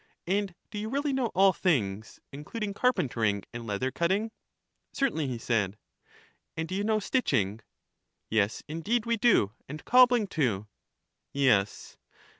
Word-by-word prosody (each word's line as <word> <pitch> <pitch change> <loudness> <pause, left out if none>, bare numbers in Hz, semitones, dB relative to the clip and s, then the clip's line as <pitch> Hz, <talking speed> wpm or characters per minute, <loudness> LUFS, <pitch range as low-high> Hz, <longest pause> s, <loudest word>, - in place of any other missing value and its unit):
And 195 0 -1 0.2
do 210 - -4
you 215 +1 -4
really 280 +2 -1
know 260 -3 +1
all 195 0 +5
things, 110 - -1
including 200 +9 -5
car 250 +5 +3
pentering 115 - -1
and 120 -1 -7
leather 110 +6 -1
cutting? 190 - 0 0.6
Certainly, 210 - 0
he 125 -2 -3
said. 110 -4 -1 0.8
And 160 0 -2
do 185 - -6
you 200 +2 -1
know 215 0 +2
stitching? 125 - 0 0.7
Yes, 105 -1 0
indeed 205 +10 -1
we 235 0 +1
do, 210 - +3 0.2
and 150 +2 -8
cobbling, 245 -2 +5
too. 120 - -1 0.7
Yes. 105 -8 +1
165 Hz, 140 wpm, -28 LUFS, -, 0.8 s, all